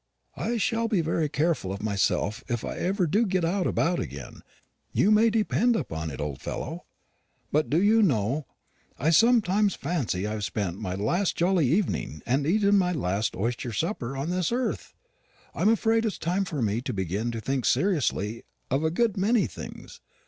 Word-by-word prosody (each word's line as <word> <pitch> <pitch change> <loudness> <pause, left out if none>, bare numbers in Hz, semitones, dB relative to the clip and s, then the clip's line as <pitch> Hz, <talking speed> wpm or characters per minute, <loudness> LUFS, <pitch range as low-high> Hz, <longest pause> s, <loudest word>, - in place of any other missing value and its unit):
"I 235 +1 -2
shall 230 +1 0
be 205 -6 +1
very 160 -1 0
careful 150 - 0
of 100 +1 -6
myself 105 +2 0
if 120 -3 -2
I - - -4
ever 190 +1 0
do 200 +9 +2
get 185 -4 0
about 175 -1 +1
again, 70 -3 -7 0.5
you 210 - +3
may 220 +2 +5
depend 225 +2 +2
upon 80 - -3
it, 70 - -7
old 75 -2 -4
fellow. - - -5 0.7
But 150 +1 +1
do 155 - +3
you 215 +4 +4
know 135 - +1 0.5
I 160 - +1
sometimes 210 -1 +4
fancy 135 - -2
I 105 - -2
have 110 -1 -3
spent 100 -4 -2
my 90 0 -3
last 170 - 0
jolly 175 -4 +3
evening, 155 - -1
and 135 +4 +1
eaten 200 +2 +4
my 180 -1 +1
last 105 - -1
oyster 120 +4 -2
supper, 135 - -2
on 145 +6 -2
this 180 +1 0
earth? 250 +1 -2 0.6
I'm 210 - +2
afraid 225 0 +2
it's 215 -4 -2
time 180 +4 -1
for 150 -9 -3
me 110 +2 0
to 130 -1 -4
begin 100 +4 -2
to 115 -1 -4
think 130 +3 -2
seriously 125 - +1 0.3
of 135 +4 +1
a 160 - +2
good 215 +5 0
many 210 +3 +3
things. - - -9
160 Hz, 180 wpm, -26 LUFS, -, 0.7 s, may